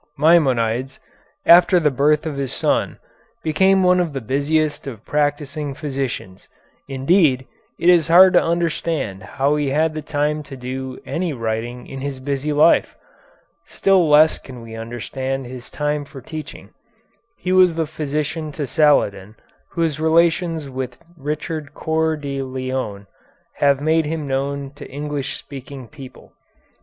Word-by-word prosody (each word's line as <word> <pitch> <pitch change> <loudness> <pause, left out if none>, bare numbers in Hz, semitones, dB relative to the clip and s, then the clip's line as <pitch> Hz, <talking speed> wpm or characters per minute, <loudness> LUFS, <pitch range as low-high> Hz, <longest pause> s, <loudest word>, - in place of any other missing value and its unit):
Maimonides, 130 -5 +2 0.5
after 180 +1 +7
the 150 -3 +2
birth 145 +4 +2
of 155 -3 -3
his 140 -2 -3
son, - - 0 0.5
became 190 +4 +3
one 180 0 +4
of 170 -4 -1
the 135 - -2
busiest 145 +5 -1
of 115 -5 -8
practising 145 -1 -1
physicians. 135 -10 -5 0.4
Indeed, 135 -1 +2 0.3
it 170 - 0
is 175 -3 +5
hard 180 +3 +7
to - - +6
understand 165 - -1
how 140 +7 0
he 145 -2 0
had 155 +3 +1
the 155 - -4
time 150 0 -1
to 140 -2 -10
do 130 +1 -6
any 170 -2 -2
writing 115 +1 -4
in 135 -1 -8
his 140 -1 -4
busy 140 +2 -2
life. 150 +3 +4 0.7
Still 190 -5 +2
less 155 +2 +5
can 125 -3 -11
we 115 -1 -10
understand 130 +4 -4
his 125 0 -9
time 150 0 -2
for 140 -1 -11
teaching. 155 +4 -9 0.7
He 185 - -3
was 185 -2 +5
the 165 -1 0
physician 150 +1 -3
to 145 - -3
Saladin, 110 - +2 0.3
whose 160 -3 -1
relations 165 0 +2
with 130 -2 -5 0.2
Richard 150 0 -5
Coeur 160 0 0
de 140 -2 -4
Lion 130 -6 -4 0.5
have 140 -1 +3
made 160 +2 +2
him 155 0 -3
known 140 +1 -2
to 145 - -11
English 145 0 -4
speaking 135 -2 -10
people. 135 -3 -13
145 Hz, 145 wpm, -20 LUFS, 130-160 Hz, 0.7 s, after